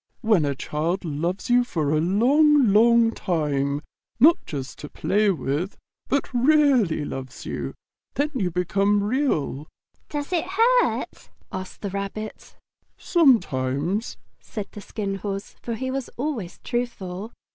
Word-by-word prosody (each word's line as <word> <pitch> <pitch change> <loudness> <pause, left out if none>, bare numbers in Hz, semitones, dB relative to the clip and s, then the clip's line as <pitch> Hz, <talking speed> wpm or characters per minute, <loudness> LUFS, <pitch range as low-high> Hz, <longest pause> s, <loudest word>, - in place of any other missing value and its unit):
When 215 -9 +3
a 140 -1 -1
child 165 +7 -2
loves 170 +8 -2
you 245 0 +5
for 155 -11 -1
a 155 0 +2
long, 255 - +4
long 230 +1 +5
time, 145 -7 -1 0.4
not 315 +7 +6
just 135 -3 -6
to 150 - -8
play 210 +1 +1
with, 170 +1 -2 0.3
but 280 0 -1
REALLY 250 - +3
loves 130 -2 -7
you, - - -4 0.4
then 290 +2 0
you 195 -9 0
become 195 +4 +1
Real." 205 - 0 0.4
"Does 295 +4 -4
it 345 - +1
hurt?" - - +1 0.2
asked 185 0 -7
the 200 - -3
Rabbit. 200 +2 -6 0.4
"Sometimes," 185 - +2 0.2
said 210 -3 -7
the 205 - -9
Skin 200 -1 -4
Horse, 195 0 -5
for 235 - -3
he 260 +3 -3
was 270 -1 -3
always 240 - -3
truthful. 220 -4 -4
205 Hz, 135 wpm, -24 LUFS, 165-245 Hz, 0.4 s, not